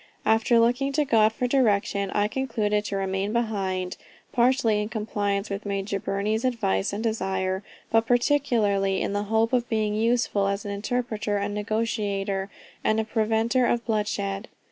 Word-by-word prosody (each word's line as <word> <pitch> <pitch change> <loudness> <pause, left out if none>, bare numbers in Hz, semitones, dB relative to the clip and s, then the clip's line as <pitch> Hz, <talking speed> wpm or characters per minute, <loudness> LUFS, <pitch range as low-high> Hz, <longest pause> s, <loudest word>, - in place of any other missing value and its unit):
After 225 +2 +4
looking 245 +4 +2
to 300 +1 +2
God 220 -4 +4
for 250 - -2
direction, 205 -6 +1
I 205 +1 +1
concluded 215 -4 -1
to 200 - -3
remain 195 +1 -1
behind, 195 -6 -1 0.3
partly 240 -3 +3
in 210 - -3
compliance 205 -2 -2
with 200 +1 -3
Major 200 0 -2
Burney's 210 +4 -1
advice 220 - 0
and 205 +2 -4
desire, 190 -4 -1 0.3
but 225 0 +3
particularly 230 -7 +2
in - - -2
the 205 0 -1
hope 225 +3 +1
of 240 -1 +1
being 215 -2 0
useful 225 -2 +1
as 200 +1 -2
an 205 - -3
interpreter 215 0 -2
and 200 +1 -2
negotiator, 205 -2 -1 0.3
and 215 0 +2
a - - +1
preventer 225 +3 +1
of 235 -1 0
bloodshed. 210 -2 -2
215 Hz, 155 wpm, -25 LUFS, 200-230 Hz, 0.3 s, After